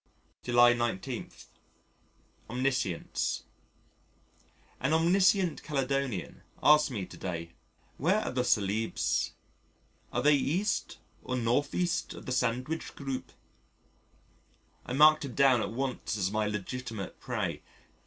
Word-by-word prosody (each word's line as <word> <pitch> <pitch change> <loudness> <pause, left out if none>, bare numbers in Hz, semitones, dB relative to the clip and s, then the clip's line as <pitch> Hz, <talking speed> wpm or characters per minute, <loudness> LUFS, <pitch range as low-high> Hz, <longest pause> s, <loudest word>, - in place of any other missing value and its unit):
July 120 0 +5
19. 120 -5 -3 1.2
Omniscience 125 -7 -1 1.4
An 135 +4 +1
omniscient 180 +1 +3
Caledonian 135 - -2 0.2
asked 150 0 +6
me 105 -8 -4
to - - -13
day: 85 -3 -5 0.5
"Where 185 +9 +2
are - - -3
the 125 -1 0
Celebes? 110 -1 0 0.8
Are - - -1
they 150 +1 +6
E. 155 +8 +1 0.6
or 125 - -3
N.E. 120 -2 -1 0.7
of - - -10
the - - -4
Sandwich 125 +5 -1
Group?" 135 -2 -5 1.6
I 125 - -3
marked 155 +3 +6
him 125 - -7
down 135 -4 +5
at - - -2
once 125 -2 -3
as 95 -1 0
my 105 0 0
legitimate 105 0 -5
prey. 105 - -3
125 Hz, 110 wpm, -30 LUFS, 110-140 Hz, 1.6 s, asked